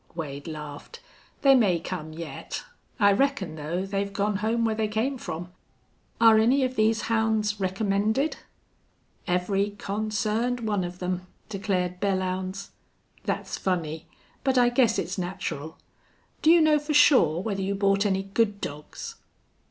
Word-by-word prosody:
Wade 145 -3 -5
laughed. 150 - -8 0.4
"They 275 -1 +7
may 200 -10 +4
come 160 -2 -5
yet. 155 -3 -6 0.4
I 200 -1 +6
reckon, 210 - +1
though, 160 +5 -3
they've 200 0 -2
gone 200 0 0
home 225 +3 0
where 220 - +1
they 215 0 0
came 235 +5 -1
from. 175 -2 -5 0.7
Are 225 -1 +7
any 255 +5 +4
of 255 0 -1
these 220 0 +2
hounds 220 -2 +1
recommended?" 205 +8 0 0.9
"Every 195 +3 0
consarned 215 +4 -1
one 210 -4 0
of 175 0 -5
them," 180 0 -3 0.2
declared 185 -3 -1
Belllounds. 190 0 -1 0.6
"That's - - -3
funny. 160 -4 -2 0.4
But 265 -1 +2
I 245 -1 +5
guess 240 -2 +3
it's - - -2
natural. 160 -4 -4 0.6
Do 310 - +4
you 335 0 +7
know 305 -1 +5
for 295 +1 -2
sure 255 - +6
whether 195 0 -2
you 195 +1 -1
bought 195 0 +2
any 195 -2 +1
good 205 +1 0
dogs?" 150 -3 -7
200 Hz, 145 wpm, -26 LUFS, 180-225 Hz, 0.9 s, They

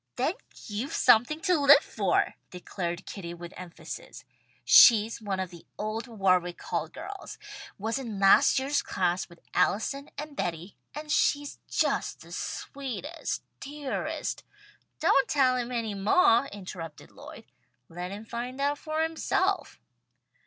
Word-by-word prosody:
"Then - - +1 0.3
you've 225 +7 -4
something 245 +8 +4
to 360 -4 +2
live 285 +1 +7
for!" - - 0 0.2
declared 180 0 -5
Kitty 170 -4 -7
with 175 +1 -9
emphasis. 180 -2 -9 0.4
"She's 225 -1 +7
one 200 -3 -3
of 185 -1 -3
the 170 -2 -14
old 215 +3 -3
Warwick 185 -5 +1
Hall 160 - -3
girls. 375 - -9 0.4
Was 225 +6 -2
in 230 -6 -5
last 195 0 +6
year's 275 +2 +1
class 175 +1 -1
with 170 -1 -17
Allison 225 +10 0
and 300 0 -6
Betty, 175 - -4 0.2
and 300 0 -6
she's 290 -1 +1
just - - 0
the - - -14
sweetest, 280 - -5 0.2
dearest 285 -1 -4 0.3
" - - -36
"Don't 275 - +4
tell 265 -4 +3
him 250 0 -3
any 230 -3 -2
moah," 230 - +4
interrupted 180 -6 -9
Lloyd. - - -12 0.4
"Let 175 +2 -6
him 205 +3 -8
find 245 +3 -5
out 285 +1 0
for 310 0 -1
himself." 370 +4 -1
230 Hz, 140 wpm, -28 LUFS, 190-285 Hz, 0.4 s, live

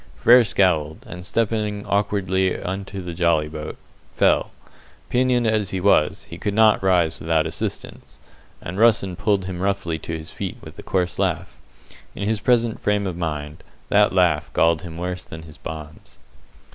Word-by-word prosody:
Frere 120 +1 +6
scowled, 80 -7 +1
and, 90 0 -8
stepping 105 0 -1
awkwardly 95 -2 0
into 95 +1 -5
the 90 -1 -5
jolly 85 -3 +2
boat, 75 0 -7 0.4
fell. - - +3 0.6
Pinioned 125 -1 +2
as 110 -3 +1
he 95 - -2
was, 90 -5 +2
he - - -10
could 100 -1 -2
not 110 -1 +5
rise 90 -4 +2
without 80 -1 +1
assistance, 80 - -5 0.4
and 90 +4 -6
Russen 105 -5 +3
pulled 100 -1 0
him 90 -1 -5
roughly 95 -5 -1
to 80 +2 -5
his 80 0 -10
feet - - -5
with - - -12
a - - -5
coarse 90 -1 -1
laugh. 90 -2 -1 0.6
In 100 - -3
his 110 -1 0
present 115 0 +1
frame 105 -1 0
of 90 -3 -3
mind, 75 -3 -4 0.3
that 105 0 +4
laugh 90 -3 +2
galled 80 -1 +3
him 85 -2 -8
worse 90 +1 -4
than 80 0 -10
his 80 -2 -13
bonds. 75 -1 -9
95 Hz, 165 wpm, -22 LUFS, 80-105 Hz, 0.6 s, Frere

